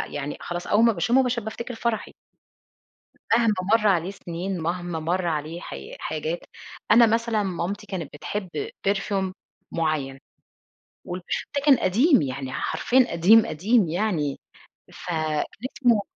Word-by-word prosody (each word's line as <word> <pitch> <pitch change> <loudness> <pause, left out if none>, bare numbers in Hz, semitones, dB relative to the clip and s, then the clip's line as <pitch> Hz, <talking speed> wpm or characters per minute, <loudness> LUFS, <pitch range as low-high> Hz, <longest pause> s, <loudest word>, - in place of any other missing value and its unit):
يعني 145 0 -4
خلاص، 175 0 -5
أول 215 +2 +4
ما 230 - +5
باشمه 230 +9 +3
باش 250 -1 0
بافتكر 230 +2 -6
فرحي. 230 -1 -2 1.2
مهما 230 -2 +4 0.2
مَر 215 -2 +1
عليه 185 -2 +2
سنين، 185 0 -5
مهما 175 0 -2
مر 175 +3 -1
عليه 160 +1 -2
حاي 70 0 -8
حاجات، 155 +2 -3 0.5
أنا 235 +2 +8
مثلًا 225 -1 +1
مامتي 195 +2 -3
كانت 180 -7 -5
بتحب 190 +5 -5 0.4
perfume 195 -1 0 0.4
معين. 155 -5 -1 0.9
والperfume 175 0 -4
ده 280 - +1
كان 280 -3 +7
قديم 250 - +4
يعني، 130 -1 -4
حرفيًا 255 - +2
قديم 190 +7 +6
قديم 200 +5 +2
يعني، 170 -6 -1 0.5
فكان 155 -3 -2 0.3
اسمه 235 -5 +4
185 Hz, 130 wpm, -25 LUFS, 160-220 Hz, 1.2 s, أنا